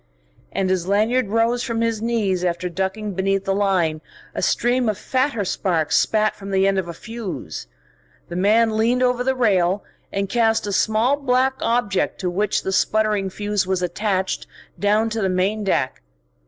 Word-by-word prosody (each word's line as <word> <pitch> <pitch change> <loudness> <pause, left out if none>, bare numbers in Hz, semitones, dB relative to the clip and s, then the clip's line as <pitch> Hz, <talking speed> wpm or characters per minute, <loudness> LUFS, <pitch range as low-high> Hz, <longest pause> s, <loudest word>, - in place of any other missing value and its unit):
And 190 -1 0
as 185 -2 0
Lanyard 220 +5 +2
rose 230 +3 +1
from 230 -3 -2
his 230 -2 0
knees 210 -6 0
after 180 0 -1
ducking 190 +4 -3
beneath 195 +1 0
the 195 - +1
line, 185 -6 +1 0.3
a - - -3
stream 245 -1 +1
of 210 - -1
fatter 255 -3 0
sparks 175 -4 0
spat 215 -1 +2
from 195 -1 -9
the 195 0 +2
end 195 -1 +2
of 180 - -3
a 170 - -5
fuse. 195 - -6 0.6
The 170 - -7
man 215 +4 +3
leaned 240 +3 +2
over 250 -1 +2
the 265 +1 +1
rail 195 -5 +2 0.3
and 195 0 -1
cast 225 0 +2
a 205 - -3
small 220 +7 +2
black 260 -1 +2
object 230 -5 0
to 180 -2 -1
which 205 +3 0
the 190 - -2
sputtering 210 0 +1
fuse 205 0 -2
was 185 -1 0
attached, 190 0 -1 0.3
down 215 +2 +2
to 225 0 -2
the 190 - +1
main 190 +4 0
deck. 160 -9 0
205 Hz, 175 wpm, -21 LUFS, 190-230 Hz, 0.6 s, man